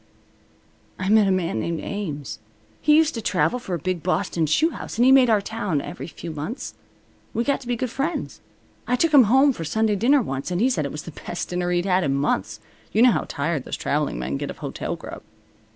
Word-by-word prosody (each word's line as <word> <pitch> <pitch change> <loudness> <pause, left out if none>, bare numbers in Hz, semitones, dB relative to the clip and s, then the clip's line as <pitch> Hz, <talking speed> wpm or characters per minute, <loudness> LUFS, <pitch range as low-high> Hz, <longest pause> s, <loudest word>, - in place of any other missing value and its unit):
"I 185 +1 -2
met 215 -1 +5
a - - +3
man 170 -11 0
named 165 +7 -2
Ames. 150 - -5 0.4
He 300 0 +5
used 320 0 +4
to 230 - -4
travel 250 +3 +1
for 190 -7 -4
a - - -2
big 180 +1 -3
Boston 175 -1 0
shoe 310 - +3
house, - - -7
and 240 - +4
he 260 - +6
made 265 -2 +6
our 215 -2 +4
town 200 -7 -2
every 170 - -7
few 165 0 -8
months. 155 - -5 0.6
We 235 - +1
got 280 +2 0
to 250 - -11
be 245 - 0
good 245 0 -3
friends. 300 +7 -3 0.5
I 250 - +2
took 315 +5 +1
him 270 -5 +8
home 265 +6 +5
for 165 - -6
Sunday 215 +6 +1
dinner 255 +6 +3
once, 135 -5 -4
and 180 -1 -1
he 255 +5 +3
said 155 - 0
it 140 - -4
was 150 - -6
the 170 - -8
best 175 +3 -6
dinner 180 0 -1
he'd 175 0 0
had 185 -1 +2
in 135 -3 +1
months. 110 -7 -1 0.3
You 220 - +4
know 250 - +7
how - - -1
tired 145 -1 -2
those - - -5
traveling 145 - -1
men 65 +3 -3
get - - -4
of - - -7
hotel - - -4
grub." - - -9
190 Hz, 230 wpm, -23 LUFS, 155-245 Hz, 0.6 s, him